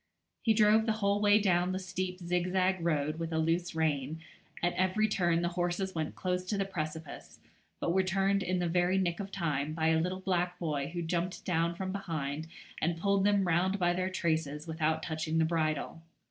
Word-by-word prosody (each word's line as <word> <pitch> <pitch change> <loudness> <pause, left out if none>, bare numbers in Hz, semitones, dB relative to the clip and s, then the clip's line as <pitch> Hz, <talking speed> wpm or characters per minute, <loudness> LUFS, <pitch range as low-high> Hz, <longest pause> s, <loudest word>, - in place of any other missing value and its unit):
He 220 -2 +3
drove 215 +1 +5
the 220 - +3
whole 200 -1 +1
way 205 0 +6
down 180 -2 +2
the - - -1
steep 185 0 -3
zigzag 180 +1 0
road 155 -1 0
with 165 0 -3
a 160 - 0
loose 165 +2 0
rein; 155 -1 0 0.4
at 175 - +2
every 190 +4 +2
turn 175 -4 +1
the 175 - +1
horses 175 +2 -1
went 160 -2 -3
close 180 0 -1
to 205 +2 -1
the 195 - 0
precipice, 160 -4 -6 0.4
but 170 - 0
were 190 - +4
turned 195 +1 +1
in 185 0 0
the 175 -1 0
very 175 +2 +2
nick 175 -3 0
of 200 -1 -5
time 155 -5 -1
by 160 0 +2
a 160 0 +3
little 185 +2 -2
black 180 -1 0
boy 150 -5 -2
who 175 0 -4
jumped 175 +2 -2
down 170 -1 +1
from 185 +1 -3
behind 160 -6 -3 0.3
and 170 +1 +1
pulled 200 +2 +2
them 205 -2 +3
round 180 +4 +2
by 175 -2 +2
their 185 +1 -1
traces 160 -5 -1
without 160 -1 -1
touching 160 0 -2
the 160 - +4
bridle. 160 0 -1
175 Hz, 200 wpm, -31 LUFS, 160-190 Hz, 0.4 s, way